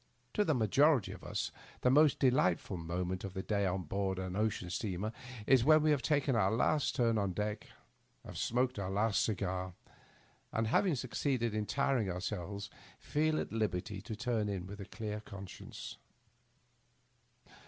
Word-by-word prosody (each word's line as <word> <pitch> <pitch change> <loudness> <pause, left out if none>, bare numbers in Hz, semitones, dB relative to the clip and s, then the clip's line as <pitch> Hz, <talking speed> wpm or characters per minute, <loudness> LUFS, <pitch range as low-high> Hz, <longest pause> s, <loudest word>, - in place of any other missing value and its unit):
To 210 - +3
the 155 -7 +2
majority 130 - +4
of - - -10
us - - -2 0.3
the 125 - +4
most 150 +1 +5
delightful 105 -7 +2
moment 90 +2 -3
of 95 -2 -6
the 95 - -3
day 100 -2 +1
on 95 0 -1
board 95 +3 -1
an 95 -1 -4
ocean 105 -4 -1
steamer 100 +2 -2 0.3
is 130 -1 +5
when 155 +2 +6
we 155 - +4
have 145 -3 +2
taken 145 -3 +2
our 100 -4 +3
last 130 +7 +1
turn 115 -3 +2
on 100 -2 0
deck, 105 +2 -3 0.6
have - - -9
smoked 125 -1 +1
our 95 -2 -2
last 105 +1 +2
cigar, 95 -3 -2 0.8
and 115 - 0
having 160 - +3
succeeded 125 -2 -1
in 105 -1 -1
tiring 135 -7 +1
ourselves, 95 +2 -4 0.3
feel 155 +1 0
at - - -4
liberty 100 -2 -2
to 110 +2 -6
turn 115 -2 -1
in 95 -3 -3
with 100 +2 -8
a - - -6
clear 105 0 -5
conscience. 100 -4 -9
105 Hz, 165 wpm, -34 LUFS, 95-125 Hz, 0.8 s, when